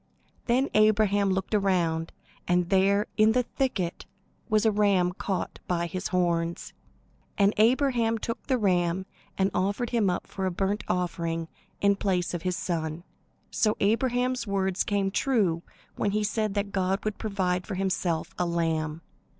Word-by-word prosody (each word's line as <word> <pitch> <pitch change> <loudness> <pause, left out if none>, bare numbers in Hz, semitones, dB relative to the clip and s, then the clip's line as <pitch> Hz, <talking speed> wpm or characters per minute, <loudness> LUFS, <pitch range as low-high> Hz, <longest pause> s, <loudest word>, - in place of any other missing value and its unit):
Then 260 +3 +2
Abraham 210 -2 +4
looked 190 +2 -1
around, 175 -5 +1 0.4
and 180 0 +1
there 200 +2 +3
in 215 0 +5
the 250 +1 +2
thicket 220 -10 -2 0.4
was 215 0 +2
a 220 - +5
ram 200 -4 +3
caught 190 0 -3
by 170 -1 0
his 185 +2 -4
horns. 170 -2 -1 0.6
And 200 +1 +4
Abraham 235 0 +3
took 230 +1 -5
the 260 -2 +2
ram 185 -3 +1 0.3
and 190 0 +2
offered 200 +6 -1
him 225 -5 +2
up 180 - -2
for 190 -1 -3
a - - +1
burnt 195 +3 -1
offering 170 -2 -2 0.3
in 200 0 +4
place 180 -4 0
of 175 - -3
his 180 +1 -1
son. 160 -1 -3 0.5
So 215 -1 +1
Abraham's 245 +3 +1
words 190 -1 0
came 200 -1 0
true 200 -9 +1 0.4
when 205 - +1
he 210 0 +1
said 215 0 -1
that 200 0 -1
God 190 +1 -1
would 215 -1 -2
provide 185 -4 -1
for 195 - -3
himself 180 -3 -1
a 180 - +2
lamb. 165 -2 -1
195 Hz, 155 wpm, -27 LUFS, 180-215 Hz, 0.6 s, in